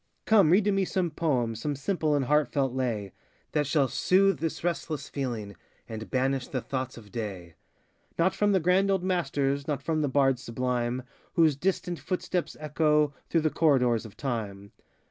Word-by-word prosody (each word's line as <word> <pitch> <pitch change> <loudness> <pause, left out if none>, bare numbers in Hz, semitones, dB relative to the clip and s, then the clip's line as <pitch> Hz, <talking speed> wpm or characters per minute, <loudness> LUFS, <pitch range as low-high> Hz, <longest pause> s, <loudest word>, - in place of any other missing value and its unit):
Come, 205 -7 +5
read 190 +5 +5
to 205 - +2
me 195 0 +2
some 180 -2 -1
poem, 130 -8 0
Some 145 +6 -3
simple 155 +1 0
and 140 -2 +1
heartfelt 140 -2 +1
lay, 115 -7 -2 0.4
That 150 -2 0
shall 140 -2 +2
soothe 195 +7 +3
this 165 -1 -3
restless 160 -3 -2
feeling, 115 -7 -4 0.3
And 110 0 -7
banish 130 0 0
the 130 - -2
thoughts 130 0 -4
of 105 -3 -13
day. 95 -7 -5 0.6
Not 175 +3 +3
from 205 0 +2
the 190 - +4
grand 185 +3 +3
old 190 -2 +1
masters, 140 -6 0
Not 150 -3 -2
from 160 -1 0
the 145 - 0
bards 135 -2 +2
sublime, 125 +1 -2 0.3
Whose 160 -4 +4
distant 175 +1 -1
footsteps 180 +4 -3
echo 150 -1 +2 0.2
Through 165 - +2
the 155 -1 +1
corridors 125 -8 +3
of 110 -3 -12
Time. 105 -7 -4
140 Hz, 170 wpm, -28 LUFS, 125-165 Hz, 0.6 s, Come